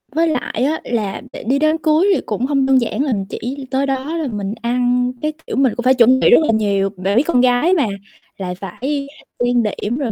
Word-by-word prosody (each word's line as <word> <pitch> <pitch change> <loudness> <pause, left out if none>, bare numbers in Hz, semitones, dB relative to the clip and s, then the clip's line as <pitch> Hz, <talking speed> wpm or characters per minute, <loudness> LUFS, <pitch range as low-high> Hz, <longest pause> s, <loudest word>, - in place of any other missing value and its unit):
Với 330 +1 +3
lại 275 -4 -2
á 310 +3 0
là 215 -5 -3
để - - -8
đi 265 +5 +1
đám 310 +1 +2
cưới 315 +3 +2
thì - - -1
cũng 215 +4 -2
hông 275 -1 +1
đơn 265 -1 +4
giản 235 - -2
là 270 -5 0
mình 195 -2 -2
chỉ 265 +5 -5
tới 270 +1 +1
đó 270 +5 -2
là 310 -4 -2
mình 205 0 -3
ăn, 245 +1 +1
cái, 305 0 -1
kiểu, - - -4
mình 265 -4 +2
cũng 245 - -4
phải 260 - +5
chuẩn 255 +1 +5
bị - - +4
rất - - +7
là - - +2
nhiều, 200 -2 +1
bạn 195 +3 0
biết 250 - +5
con 250 -7 +3
gái 255 +8 +3
mà 300 -10 +2 0.5
lại 180 -2 -4
phải 270 +10 -4 0.4
trang 245 -1 +2
điểm 210 +3 -2
rồi 260 -6 -2
250 Hz, 245 wpm, -18 LUFS, 225-280 Hz, 0.5 s, rất